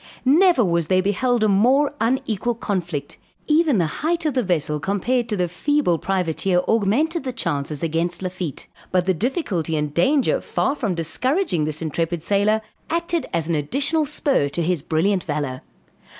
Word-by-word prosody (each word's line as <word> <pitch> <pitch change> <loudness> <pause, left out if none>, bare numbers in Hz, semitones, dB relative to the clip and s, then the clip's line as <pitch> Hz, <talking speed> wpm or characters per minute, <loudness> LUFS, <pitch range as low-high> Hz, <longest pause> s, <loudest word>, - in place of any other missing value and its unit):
Never 320 - +5
was 170 -3 0
there 185 +1 +2
beheld 225 +4 +1
a - - +4
more 255 +9 +3
unequal 235 -1 0
conflict; 175 - -4 0.3
even 305 -4 +3
the 175 - +2 0.2
height 330 +2 0
of 305 - +1
the 255 - +1
vessel 155 -7 -1
compared 235 - -1
to 210 - -1
the 180 -1 +1
feeble 180 - +1
privateer 185 -1 0
augmented 255 - +1
the 260 - -3
chances 145 - -3
against 170 +3 -1
Lafitte; 180 -5 -5 0.3
but 180 -1 +2
the 190 - +2
difficulty 190 - -1
and 150 -1 -2
danger 275 - +2
far - - 0
from 225 -11 -2
discouraging 180 - 0
this 155 +1 -2
intrepid 165 +1 -2
sailor, 205 +3 +2 0.3
acted 340 0 -1
as 165 -2 -1
an 170 - 0
additional 280 - 0
spur 265 - +1
to 170 +4 -2
his 175 -2 0
brilliant 175 +5 +1
valor. 145 -4 -3
195 Hz, 165 wpm, -22 LUFS, 165-260 Hz, 0.3 s, Never